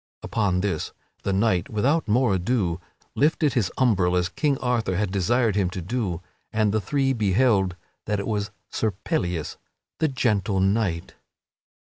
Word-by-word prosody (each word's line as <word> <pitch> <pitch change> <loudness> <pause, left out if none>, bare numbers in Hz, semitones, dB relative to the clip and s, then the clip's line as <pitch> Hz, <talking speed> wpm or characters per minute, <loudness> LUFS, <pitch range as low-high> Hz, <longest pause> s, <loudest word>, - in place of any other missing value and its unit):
Upon 95 -5 0
this 95 -6 -2 0.3
the 100 - -1
knight 95 -2 +1
without 135 +8 +1
more 115 0 +3
ado 95 -2 0 0.3
lifted 150 -1 +2
his 115 -9 +1
umbril 95 -8 +3
as 90 -1 +1
King 145 -3 0
Arthur 120 -8 0
had 100 0 0
desired 110 +3 +2
him 95 -3 +2
to 95 - -5
do 95 -4 -2 0.3
and 110 -2 +2
the 110 - +1
three 135 +5 +1
beheld 100 -3 +2 0.3
that 105 -1 0
it 100 - -3
was 105 -1 -1 0.2
Sir 110 -2 0
Pellias, 85 -3 -1 0.4
the 160 - +3
Gentle 105 -8 0
Knight. 95 -3 0
105 Hz, 150 wpm, -24 LUFS, 95-120 Hz, 0.4 s, more